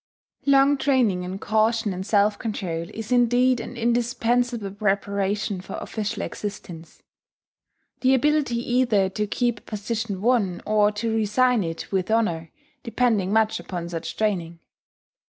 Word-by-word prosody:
Long 275 Hz, 0 st, +5 dB
training 250 Hz, -10 st, +2 dB
in 180 Hz, +1 st, -5 dB
caution 220 Hz, 0 st, +1 dB
and 185 Hz, +1 st, -4 dB
self 205 Hz, 0 st, +2 dB
control 180 Hz, -7 st, -3 dB
is 225 Hz, +2 st, -7 dB
indeed 245 Hz, +1 st, +3 dB
an 245 Hz, -, -7 dB
indispensable 240 Hz, -2 st, 0 dB
preparation 200 Hz, -1 st, -1 dB
for -, -, -8 dB
official 215 Hz, -1 st, -4 dB
existence; 175 Hz, -5 st, -7 dB, 1.0 s
the 260 Hz, 0 st, +4 dB
ability 290 Hz, -2 st, +1 dB
either 235 Hz, -5 st, +2 dB
to 210 Hz, +2 st, -2 dB
keep 240 Hz, +1 st, 0 dB
a -, -, -28 dB
position 215 Hz, -1 st, -4 dB
won, 215 Hz, -6 st, +1 dB
or 210 Hz, -1 st, +3 dB
to 225 Hz, +2 st, -2 dB
resign 225 Hz, +2 st, +2 dB
it 165 Hz, -1 st, -6 dB
with 190 Hz, -1 st, -1 dB
honour, 175 Hz, -8 st, 0 dB, 0.3 s
depending 230 Hz, -6 st, +1 dB
much 220 Hz, 0 st, +2 dB
upon 175 Hz, -2 st, -6 dB
such 165 Hz, -1 st, -5 dB
training. 180 Hz, -6 st, -1 dB
215 Hz, 135 wpm, -24 LUFS, 195-240 Hz, 1.0 s, Long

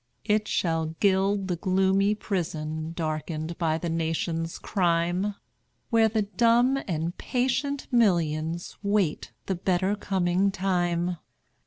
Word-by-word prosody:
It 210 Hz, 0 st, +1 dB
shall 165 Hz, -2 st, 0 dB
gild 195 Hz, 0 st, +2 dB
the 180 Hz, -2 st, -1 dB
gloomy 190 Hz, +2 st, +2 dB
prison, 160 Hz, -6 st, -3 dB
Darkened 155 Hz, 0 st, -3 dB
by 160 Hz, -2 st, +1 dB
the 170 Hz, -, -4 dB
nation's 165 Hz, 0 st, -2 dB
crime, 175 Hz, +2 st, 0 dB, 0.6 s
Where 225 Hz, -1 st, +5 dB
the 215 Hz, 0 st, +1 dB
dumb 235 Hz, +6 st, +3 dB
and 170 Hz, -1 st, -2 dB
patient 260 Hz, +2 st, -1 dB
millions 170 Hz, -7 st, +1 dB
Wait 200 Hz, -6 st, 0 dB
the 195 Hz, -, -1 dB
better 185 Hz, +2 st, 0 dB
coming 190 Hz, -1 st, +1 dB
time. 180 Hz, -2 st, 0 dB
180 Hz, 115 wpm, -26 LUFS, 165-205 Hz, 0.6 s, Where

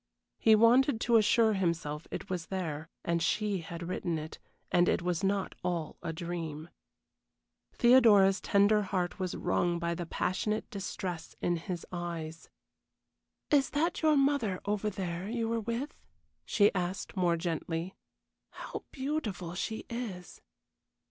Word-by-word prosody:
He 220 Hz, -1 st, +6 dB
wanted 235 Hz, +3 st, +5 dB
to 235 Hz, -1 st, +4 dB
assure 220 Hz, 0 st, +4 dB
himself 170 Hz, -5 st, -1 dB
it -, -, -6 dB
was 180 Hz, -3 st, -4 dB
there, 165 Hz, -5 st, -4 dB, 0.2 s
and 170 Hz, 0 st, +1 dB
she 200 Hz, +4 st, +1 dB
had 170 Hz, +1 st, -7 dB
written 175 Hz, -2 st, -2 dB
it 155 Hz, 0 st, -7 dB, 0.3 s
and 175 Hz, 0 st, +4 dB
it -, -, +1 dB
was 180 Hz, +1 st, -1 dB
not 195 Hz, 0 st, 0 dB
all 170 Hz, -4 st, -2 dB
a 170 Hz, -, -3 dB
dream. 165 Hz, -2 st, -5 dB, 1.0 s
Theodora's 215 Hz, -6 st, +6 dB
tender 205 Hz, +1 st, +4 dB
heart 185 Hz, -2 st, -2 dB
was 185 Hz, -2 st, -2 dB
wrung 175 Hz, -1 st, +1 dB
by 170 Hz, 0 st, -1 dB
the 170 Hz, 0 st, -5 dB
passionate 210 Hz, +6 st, -1 dB
distress 185 Hz, -4 st, -5 dB
in 175 Hz, -1 st, 0 dB
his 175 Hz, 0 st, -5 dB
eyes. 170 Hz, -2 st, -5 dB, 1.0 s
"Is 285 Hz, -2 st, +4 dB
that 320 Hz, +4 st, 0 dB
your 310 Hz, -2 st, +4 dB
mother 275 Hz, -9 st, +2 dB
over 210 Hz, +1 st, 0 dB
there 185 Hz, -1 st, -4 dB
you 230 Hz, -1 st, -1 dB
were 230 Hz, 0 st, 0 dB
with?" 235 Hz, +6 st, -3 dB, 0.5 s
she 205 Hz, -1 st, +4 dB
asked, 185 Hz, +1 st, -3 dB
more 175 Hz, -3 st, +2 dB
gently. 165 Hz, +1 st, -3 dB, 0.6 s
"How -, -, -7 dB
beautiful 260 Hz, -, -3 dB
she 220 Hz, +5 st, -4 dB
is!" 215 Hz, -7 st, -6 dB
185 Hz, 140 wpm, -31 LUFS, 170-220 Hz, 1.0 s, He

